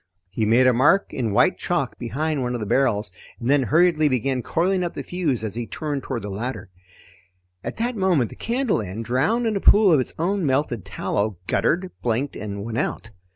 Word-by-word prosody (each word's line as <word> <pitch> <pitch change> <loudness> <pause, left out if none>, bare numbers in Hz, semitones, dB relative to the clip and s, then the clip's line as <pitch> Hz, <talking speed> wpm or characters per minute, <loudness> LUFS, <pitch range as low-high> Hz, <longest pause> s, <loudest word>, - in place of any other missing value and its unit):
He 110 +1 -1
made 120 +4 +5
a 130 - +5
mark 145 - +3
in 115 -5 -1
white 100 - +3
chalk - - -2
behind 145 +5 -2
one 125 0 -2
of - - -3
the 105 - -3
barrels 105 -3 +1 0.3
and 115 - -4
then 145 -1 +4
hurriedly 155 +3 +3
began 130 0 0
coiling 180 +7 0
up 175 - -4
the - - -4
fuse 155 -11 -2
as 110 - -3
he 115 0 -4
turned 145 +6 -3
toward 125 -5 -4
the 105 - -5
ladder. 110 -1 -5 0.9
At - - -5
that 240 +2 -1
moment 180 - +1
the - - -10
candle 240 - 0
end, 105 +3 -6
drowned 150 - +1
in 220 -2 0
a - - +1
pool 200 -2 +6
of 150 - +5
its 130 - -3
own 190 +4 0
melted 130 - 0
tallow, 105 -2 -2
guttered, 180 - 0
blinked, 125 +4 -1
and 100 -1 -5
went 115 +1 -2
out. 115 - -3
130 Hz, 205 wpm, -23 LUFS, 115-175 Hz, 0.9 s, pool